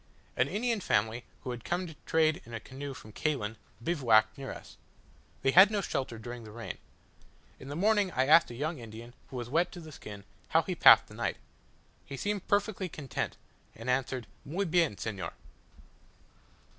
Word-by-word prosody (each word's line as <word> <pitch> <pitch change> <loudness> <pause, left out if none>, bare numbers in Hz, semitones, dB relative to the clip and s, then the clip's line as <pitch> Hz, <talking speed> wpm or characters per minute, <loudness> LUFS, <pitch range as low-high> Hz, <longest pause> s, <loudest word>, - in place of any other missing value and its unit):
An - - +3
Indian 230 +1 0
family, 110 - +1 0.2
who 125 - -3
had 120 -2 -6
come 180 +1 -1
to 165 - -8
trade 160 +1 +3
in 120 - -8
a - - -3
canoe 135 +4 -7
from 110 - -11
Caylen, 110 -8 -1 0.3
bivouacked 115 -9 +3
near 135 -1 -6
us. - - -11 0.7
They 135 - +4
had 190 +6 +9
no 210 -1 0
shelter 130 -9 -3
during 120 +2 -7
the 110 - -10
rain. 115 +2 -7 0.8
In 135 - -10
the 145 - -5
morning 205 +2 +3
I 130 - +2
asked 155 +4 +6
a 120 - -8
young 150 +4 -2
Indian, 115 +1 -10 0.2
who - - -9
was 120 -2 -4
wet 165 +7 +1
to 180 - -8
the 160 -2 -10
skin, 105 -7 -9 0.2
how - - +3
he - - -4
had - - -4
passed - - +9
the - - -15
night. - - -2 0.7
He 140 - -7
seemed 205 +4 -2
perfectly 200 -2 +1
content, 145 -4 -4 0.4
and 115 +3 -2
answered, 130 -1 -1 0.2
"Muy 180 +8 -2
bien, 165 - +2
senor." 100 -4 -4
135 Hz, 185 wpm, -31 LUFS, 115-175 Hz, 0.8 s, had